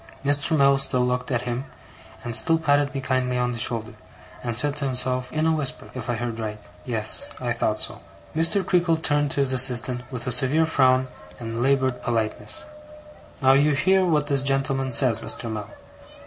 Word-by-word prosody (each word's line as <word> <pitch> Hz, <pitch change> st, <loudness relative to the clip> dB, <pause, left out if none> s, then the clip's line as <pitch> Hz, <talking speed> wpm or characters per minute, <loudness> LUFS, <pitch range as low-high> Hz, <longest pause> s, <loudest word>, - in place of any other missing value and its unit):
Mr. 145 Hz, +3 st, +3 dB
Mell 140 Hz, -1 st, +4 dB
still 130 Hz, -2 st, +2 dB
looked 125 Hz, 0 st, -2 dB
at 120 Hz, -2 st, -1 dB
him, 125 Hz, +2 st, -4 dB, 0.6 s
and 120 Hz, -1 st, -4 dB
still 165 Hz, +8 st, +3 dB
patted 145 Hz, -2 st, +1 dB
me 135 Hz, -, -2 dB
kindly 130 Hz, -1 st, -1 dB
on 125 Hz, 0 st, 0 dB
the 120 Hz, -, -5 dB
shoulder, 115 Hz, -1 st, 0 dB, 0.5 s
and 120 Hz, -2 st, -2 dB
said 145 Hz, +3 st, +3 dB
to 150 Hz, -, -3 dB
himself, 125 Hz, -1 st, 0 dB
in 155 Hz, +1 st, -1 dB
a 160 Hz, -, +3 dB
whisper, 150 Hz, -5 st, -2 dB
if 125 Hz, -2 st, -7 dB
I 120 Hz, -, 0 dB
heard 115 Hz, 0 st, -4 dB
right: 105 Hz, -1 st, -5 dB, 0.3 s
'Yes, 110 Hz, -3 st, -2 dB
I -, -, -2 dB
thought -, -, -1 dB
so.' -, -, -4 dB, 0.4 s
Mr. 170 Hz, +4 st, +1 dB
Creakle 175 Hz, -3 st, +2 dB
turned 145 Hz, -2 st, 0 dB
to 140 Hz, -, 0 dB
his 135 Hz, -1 st, +2 dB
assistant, 125 Hz, -1 st, +3 dB
with 125 Hz, -3 st, -5 dB
a 125 Hz, -, -2 dB
severe 135 Hz, +6 st, +3 dB
frown 130 Hz, -4 st, +2 dB, 0.3 s
and 115 Hz, 0 st, -5 dB
laboured 130 Hz, -1 st, +1 dB
politeness: 110 Hz, -2 st, -3 dB, 0.8 s
'Now, 130 Hz, 0 st, +6 dB
you 145 Hz, +2 st, +3 dB
hear 190 Hz, +7 st, +3 dB
what 155 Hz, -5 st, +1 dB
this 140 Hz, -2 st, +1 dB
gentleman 135 Hz, -1 st, 0 dB
says, 115 Hz, -2 st, +2 dB
Mr. 115 Hz, 0 st, -4 dB
Mell. 105 Hz, -2 st, -6 dB
130 Hz, 190 wpm, -23 LUFS, 120-145 Hz, 0.8 s, Now